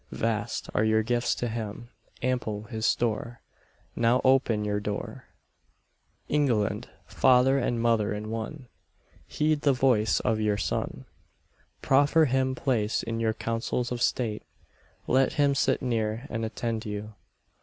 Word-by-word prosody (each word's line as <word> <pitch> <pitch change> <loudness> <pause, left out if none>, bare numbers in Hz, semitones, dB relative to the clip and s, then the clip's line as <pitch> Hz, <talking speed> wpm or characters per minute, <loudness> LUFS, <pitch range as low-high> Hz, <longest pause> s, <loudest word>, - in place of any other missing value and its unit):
Vast 115 0 -2
are 105 - +2
your 110 0 +3
gifts 120 +1 0
to 120 - -2
him, 115 +1 -6 0.3
ample 120 -5 -1
his 110 0 -2
store, 115 +1 -1 0.5
Now 120 +2 +3
open 130 -5 +3
your 105 0 0
door. 105 0 -5 1.0
England, 125 -9 0 0.2
father 130 +1 +4
and 120 -2 -1
mother 115 -3 +2
in 105 +1 -4
one, 120 +5 -5 0.6
Heed 155 -1 0
the 140 -2 +3
voice 125 -4 +2
of 115 -3 0
your 105 -1 +1
son. - - -3 0.8
Proffer 145 +4 +4
him 130 -1 +1
place 115 -5 0
in 115 0 -3
your 110 -1 0
councils 115 +2 -2
of 120 -1 -3
state: 115 -4 0 0.6
Let 130 +1 +2
him 145 -2 +3
sit 135 -1 +1
near, 115 -1 -1
and 115 0 -2
attend 110 0 -3
you. 105 +1 -6
115 Hz, 135 wpm, -27 LUFS, 110-130 Hz, 1.0 s, father